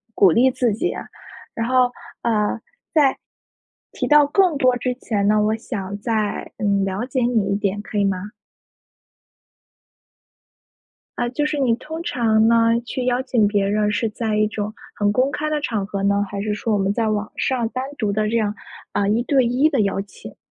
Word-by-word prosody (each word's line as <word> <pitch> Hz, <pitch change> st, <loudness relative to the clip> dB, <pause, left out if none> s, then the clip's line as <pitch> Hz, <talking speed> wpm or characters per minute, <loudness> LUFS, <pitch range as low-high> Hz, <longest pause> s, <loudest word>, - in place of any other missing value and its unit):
鼓 190 Hz, -4 st, +6 dB
励 255 Hz, +8 st, +4 dB
自 245 Hz, -4 st, 0 dB
己。 215 Hz, -, -1 dB, 0.6 s
然 230 Hz, +1 st, -2 dB
后， 255 Hz, -1 st, +3 dB, 0.3 s
呃， 220 Hz, -1 st, +1 dB, 0.3 s
在 290 Hz, -4 st, +4 dB, 0.8 s
提 -, -, -3 dB
到 295 Hz, -1 st, +6 dB
更 355 Hz, 0 st, +3 dB
多 255 Hz, -2 st, +3 dB
之 250 Hz, 0 st, -1 dB
前 205 Hz, -5 st, -1 dB
呢， 215 Hz, 0 st, +4 dB
我 215 Hz, +1 st, +1 dB
想 200 Hz, -3 st, -5 dB
再， 215 Hz, -2 st, -2 dB
嗯， 200 Hz, -2 st, +1 dB
了 195 Hz, +5 st, -2 dB
解 255 Hz, -1 st, -2 dB
你 230 Hz, -5 st, +1 dB
一 -, -, +1 dB
点 205 Hz, 0 st, -1 dB
可 210 Hz, -, -6 dB
以 -, -, +3 dB
吗？ 195 Hz, +2 st, -2 dB, 2.9 s
呃， 240 Hz, -, 0 dB
就 295 Hz, +4 st, -1 dB
是 300 Hz, 0 st, -1 dB
你 245 Hz, -4 st, +2 dB
通 320 Hz, +6 st, -7 dB
常 225 Hz, -8 st, +2 dB
呢 230 Hz, 0 st, +4 dB
去 250 Hz, +1 st, -3 dB
邀 250 Hz, 0 st, +1 dB
请 240 Hz, -5 st, +2 dB
别 200 Hz, -1 st, +1 dB
人 210 Hz, +1 st, +1 dB
是 220 Hz, +2 st, 0 dB
在 215 Hz, -1 st, -2 dB
一 215 Hz, -, +3 dB
种 210 Hz, 0 st, -4 dB, 0.2 s
很 205 Hz, 0 st, +1 dB
公 255 Hz, +5 st, +2 dB
开 305 Hz, +1 st, -2 dB
的 305 Hz, -1 st, 0 dB
场 220 Hz, -8 st, -2 dB
合 200 Hz, -1 st, -4 dB
呢， 200 Hz, 0 st, +2 dB
还 200 Hz, 0 st, -4 dB
是 210 Hz, 0 st, -1 dB
说 215 Hz, +1 st, -2 dB
我 205 Hz, -, +2 dB
们 195 Hz, +1 st, +1 dB
在 225 Hz, -1 st, 0 dB
网 210 Hz, 0 st, -2 dB
上 245 Hz, -4 st, 0 dB
单 255 Hz, +2 st, -3 dB
独 210 Hz, -3 st, 0 dB
的 215 Hz, +1 st, 0 dB
这 230 Hz, -, +1 dB
样， 210 Hz, -1 st, 0 dB, 0.4 s
啊， 200 Hz, -, +1 dB
1 220 Hz, +4 st, +2 dB
对 265 Hz, -2 st, +2 dB
1 255 Hz, +6 st, +3 dB
的 275 Hz, -8 st, +1 dB
邀 195 Hz, -1 st, 0 dB
请。 200 Hz, -, -12 dB
220 Hz, 200 characters per minute, -21 LUFS, 205-250 Hz, 2.9 s, 鼓